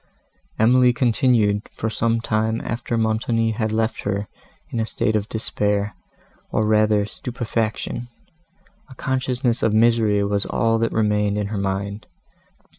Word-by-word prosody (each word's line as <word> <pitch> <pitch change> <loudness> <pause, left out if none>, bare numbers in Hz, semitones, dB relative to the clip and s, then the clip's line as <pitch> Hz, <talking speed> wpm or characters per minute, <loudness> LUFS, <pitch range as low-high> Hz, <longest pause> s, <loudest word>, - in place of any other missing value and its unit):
Emily 125 +2 +5
continued, 115 -4 +2
for 115 - -3
some 115 +1 0
time 110 0 0
after 115 0 -3
Montoni 115 +1 +1
had 110 0 -2
left 110 +1 -1
her, 100 0 -2 0.4
in 115 - -2
a 110 - +1
state 110 -1 0
of 105 0 -1
despair, 105 -2 0 0.6
or 110 - 0
rather 105 -1 +3
stupefaction; 115 0 -3 0.8
a 130 - -12
consciousness 130 -2 -1
of 110 -1 +2
misery 110 -2 +3
was 100 0 0
all 115 0 +1
that 115 - 0
remained 105 -1 +1
in 105 -1 -2
her 105 - -3
mind. 100 +1 -3
110 Hz, 135 wpm, -22 LUFS, 105-115 Hz, 0.8 s, Emily